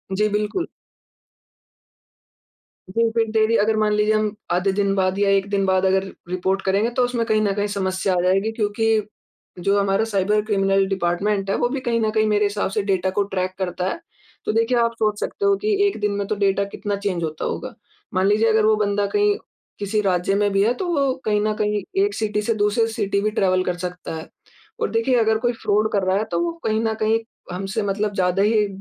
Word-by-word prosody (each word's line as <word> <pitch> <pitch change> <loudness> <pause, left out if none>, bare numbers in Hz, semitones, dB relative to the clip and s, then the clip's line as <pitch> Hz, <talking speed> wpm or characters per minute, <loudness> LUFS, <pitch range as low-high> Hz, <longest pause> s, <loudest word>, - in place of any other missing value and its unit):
जी 210 +2 +2
बिल्कुल। 210 - -1 2.3
जी 230 0 +3
फिर, 225 0 +1
डेली 220 +1 +2
अगर 220 +1 +2
मान 215 -1 +2
लीजिए 210 +1 +2
हम 215 -1 0 0.2
आधे 180 +3 +2
दिन 200 0 +1
बाद 190 0 +1
या 200 -1 +3
1 195 0 +2
दिन 200 -1 +1
बाद 190 0 +2
अगर 190 0 +2 0.3
रिपोर्ट 190 +2 -1
करेंगे 200 +4 +2
तो 250 - +4
उसमें 245 -2 -1
कहीं 215 -1 +2
न 205 -2 +1
कहीं 205 0 0
समस्या 190 -1 -1
आ - - +1
जाएगी 195 +4 +2
क्योंकि, 220 0 +1 0.6
जो 200 +3 +2
हमारा 200 +1 +1
साइबर 210 0 +1
क्रिमिनल 195 -2 +2
डिपार्टमेंट 195 +2 -1
है - - +1
वो 240 - +1
भी 275 +1 -2
कहीं 230 -1 +2
न 220 - +1
कहीं 215 0 +2
मेरे 210 0 +2
हिसाब 205 -1 -1
से 210 - 0
डाटा 190 -2 0
को 205 - +4
ट्रैक 185 0 -1
करता 180 -1 -2
है। - - -4 0.5
तो - - +1
देखिए 230 +2 +2
आप 230 -1 +2
सोच 215 -1 +1
सकते 405 - -3
हो 400 0 +4
कि 425 0 +2
एक 395 - -3
दिन 210 0 0
में 200 - -1
तो 215 - -1
डाटा 200 -1 +1
कितना 205 0 -2
चेंज 195 -4 -2
होता 155 -1 -3
होगा। - - -4 0.4
मान 185 0 +2
लीजिए 215 +2 +3
अगर 220 -1 +3
वो 215 0 +4
बंदा 205 -1 0
कहीं 415 0 +3 0.4
किसी 205 +1 0
राज्य 190 -1 +1
में 205 0 +2
भी 195 0 +3
है, 230 +4 +3
तो 355 +9 -4
वो 280 -6 +1
कहीं 210 -1 +2
न 215 - +1
कहीं 210 -1 0 0.2
एक 405 0 0
सिटी 210 -1 -1
से 230 +2 0
दूसरे 210 +2 +2
सिटी 200 -1 0
भी 215 +1 0
ट्रैवल 185 -3 +2
कर 180 -1 -2
सकता 180 -1 -5
है। 160 - -7 0.5
और - - 0
देखिए 230 +3 +1
अगर 220 -1 +3
कोई 240 +1 0
फ़्रॉड 215 -1 0
कर 200 -2 +1
रहा 185 +1 +2
है 210 - 0
तो - - 0
वो 340 - -1
कहीं 220 0 +1
ना 225 -1 0
कहीं 220 +1 +3 0.3
हमसे 195 +4 -3
मतलब 205 +1 -1
ज़्यादा 185 0 +1
ही 210 0 +3
205 Hz, 220 wpm, -22 LUFS, 195-220 Hz, 2.3 s, तो